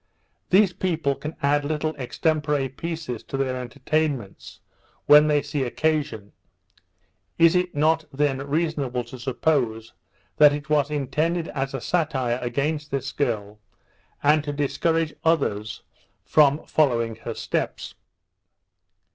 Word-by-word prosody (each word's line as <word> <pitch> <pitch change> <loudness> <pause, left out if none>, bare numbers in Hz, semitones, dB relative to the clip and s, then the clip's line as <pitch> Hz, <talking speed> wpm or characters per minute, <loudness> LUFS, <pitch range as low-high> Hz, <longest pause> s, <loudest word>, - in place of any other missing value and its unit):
These 190 -1 +4
people 165 -6 0
can 150 +3 -7
add 145 +1 +2
little 155 +1 -2
extempore 150 0 -1
pieces 155 -4 -5
to 135 - -4
their 130 -1 -1
entertainments, 130 -2 -3 0.5
when 150 +1 +7
they 150 -1 +2
see 145 -1 -3
occasion. 135 -4 -1 1.1
Is 165 +1 +5
it 180 -2 0
not 160 +2 +2
then 135 -1 0
reasonable 140 -3 -1
to 120 +2 -11
suppose 120 -3 -1 0.4
that 150 -1 +7
it 150 +1 -6
was 145 -1 +3
intended 155 +4 -1
as 135 -1 -3
a 135 - -4
satire 130 -8 0
against 145 +5 -2
this 135 -1 -3
girl, 105 -6 -2 0.6
and 150 +1 +4
to 150 - -3
discourage 160 +3 0
others 110 -10 0 0.4
from 150 0 +3
following 115 -7 +1
her - - -6
steps? - - -3
145 Hz, 120 wpm, -24 LUFS, 130-155 Hz, 1.1 s, when